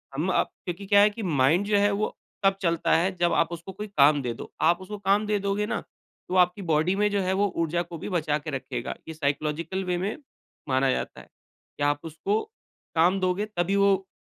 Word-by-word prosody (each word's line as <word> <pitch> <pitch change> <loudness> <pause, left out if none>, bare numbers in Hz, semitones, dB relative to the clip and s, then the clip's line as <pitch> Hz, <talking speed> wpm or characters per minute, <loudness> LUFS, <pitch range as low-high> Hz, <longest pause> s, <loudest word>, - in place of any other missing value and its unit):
हम 155 +6 -1
अप - - +2 0.2
क्योंकि 180 +3 -5
क्या 200 0 +5
है 210 - +6
कि 215 +1 -7
माइंड 155 +3 +2
जो 205 0 +2
है 205 0 +3
वो 205 +2 -1 0.3
तब 195 0 +4
चलता 170 -3 +2
है 180 +4 +2
जब 175 -1 +1
आप 165 0 +2
उसको 170 +3 -7
कोई 210 +3 -7
काम 145 -6 +4
दे 120 -2 -2
दो। - - -10
आप 170 +2 +4
उसको 205 +3 -7
काम 200 +2 +2
दे 210 -1 +1
दोगे 200 +1 -1
ना, - - -2 0.5
तो 185 - -3
आपकी 180 +2 +3
बॉडी 160 +5 +2
में 210 +1 +2
जो 200 - +1
है 185 0 0
वो 205 +1 +2
ऊर्जा 165 +1 0
को 170 -1 -7
भी 185 - -6
बचा 155 -5 0
के 150 - -7
रखेगा। 130 -1 -4
ये 160 - -5
साइकोलॉजिकल 155 +5 -2
वे 180 -1 0
में 200 - -2 0.5
माना 130 +1 +2
जाता - - -4
है, - - -18 0.5
कि 145 - -2
आप 145 0 +2
उसको 165 +7 -1 0.5
काम 180 +4 +4
दोगे, 185 +3 0
तभी 195 -2 -1
वो 195 -1 +3
180 Hz, 225 wpm, -26 LUFS, 160-200 Hz, 0.5 s, है